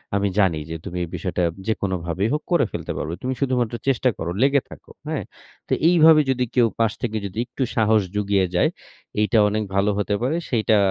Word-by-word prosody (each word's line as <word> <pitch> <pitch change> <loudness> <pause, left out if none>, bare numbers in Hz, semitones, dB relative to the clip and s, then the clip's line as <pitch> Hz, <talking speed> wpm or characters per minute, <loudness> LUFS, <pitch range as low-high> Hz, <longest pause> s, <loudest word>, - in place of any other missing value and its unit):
আমি 100 0 +1
জানি 90 -6 +3
যে 80 - -4
তুমি 90 - -5
এই 85 - -5
বিষয়টা 90 -1 -2 0.2
যেকোনোভাবেই 95 -2 -1
হোক 150 - -1
করে 170 -6 +4
ফেলতে - - -5
পারবে। 80 +2 -3
তুমি 130 +1 -1
শুধুমাত্র 125 -4 0
চেষ্টা 130 -1 +3
করো। 85 +1 -3
লেগে 140 0 +4
থাকো। - - -13 0.2
হ্যাঁ? - - -2 0.4
তো - - -1 0.2
এইভাবে 160 -3 +7
যদি 125 -1 0
কেউ 120 -2 +5
পাশ 115 -2 +3
থেকে 110 -3 -2
যদি 100 +1 -7
একটু 130 +2 -4
সাহস 110 -1 +4
জুগিয়ে 100 -2 +2
যায়, 90 - +3 0.5
এইটা 105 +1 +2
অনেক 110 +1 -1
ভালো 100 +1 +3
হতে 105 0 0
পারে। 130 +6 0
সেইটা 110 -2 +2
110 Hz, 195 wpm, -22 LUFS, 100-130 Hz, 0.5 s, এইভাবে